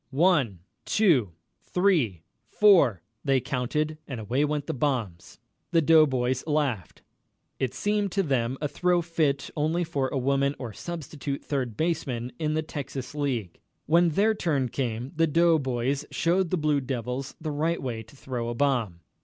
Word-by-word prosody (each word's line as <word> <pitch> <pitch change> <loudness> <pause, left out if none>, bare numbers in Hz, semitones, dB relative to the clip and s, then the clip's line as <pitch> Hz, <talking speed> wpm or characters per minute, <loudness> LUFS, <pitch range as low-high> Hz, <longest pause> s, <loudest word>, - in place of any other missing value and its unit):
"One 135 - +2 0.2
two 145 - +3 0.3
three 155 - +1 0.2
four," 155 - +4 0.2
they 135 -2 +3
counted, 140 +4 -2
and 130 -5 -5
away 120 +7 0
went 150 -1 -1
the - - -3
bombs. 120 - -2 0.3
The 165 -2 +3
doughboys 130 -5 +4
laughed. 140 - -1 0.6
It 130 -1 -1
seemed 205 -1 0
to 195 - +2
them 130 -4 0
a 150 - 0
throw 180 +3 +1
fit 155 -4 0
only 160 +3 +1
for 145 -5 -1
a 135 - -3
woman 140 +2 +1
or 125 -4 -6
a - - -16
substitute 145 -5 -5
third 130 -6 -2
baseman 140 -7 -1
in 155 -1 0
the 155 - 0
Texas 140 -4 -6
League. 130 - -2 0.3
When 170 +3 +4
their 205 +7 +3
turn 145 - 0
came, 120 0 -3
the 165 +1 +3
doughboys 140 -5 +2
showed 175 +1 +1
the 185 - 0
Blue 150 -2 +1
Devils 130 0 -4
the 155 -1 -4
right 160 +4 0
way 120 -4 -4
to 115 +5 -16
throw 125 -3 -4
a 120 - -3
bomb. 115 -10 0
140 Hz, 160 wpm, -27 LUFS, 125-160 Hz, 0.6 s, four